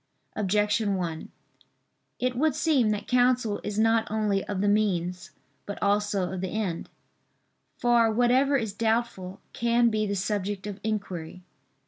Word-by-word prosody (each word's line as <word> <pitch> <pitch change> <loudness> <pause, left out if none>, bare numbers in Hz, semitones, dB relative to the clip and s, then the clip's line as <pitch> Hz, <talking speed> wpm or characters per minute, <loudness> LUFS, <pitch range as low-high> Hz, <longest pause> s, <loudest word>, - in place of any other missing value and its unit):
Objection 210 +1 +1
1: 170 -4 -4 0.9
It 250 0 -1
would 295 +2 +1
seem 285 -9 +2
that 210 -1 -2
counsel 245 -4 +2
is 210 0 -4
not 225 0 +2
only 210 -2 0
of 200 -2 -3
the 205 - +1
means 185 -4 0 0.4
but 205 - -5
also 200 -2 0
of 185 - -4
the 190 - -2
end. 195 -6 -3 0.9
For 240 -2 +3
whatever 250 +5 +3
is 220 -5 -3
doubtful, 220 -4 -1
can 235 0 +2
be 215 -1 0
the 200 - -1
subject 200 0 -2
of 205 -1 -6
inquiry. 185 -5 -4
210 Hz, 140 wpm, -27 LUFS, 195-235 Hz, 0.9 s, For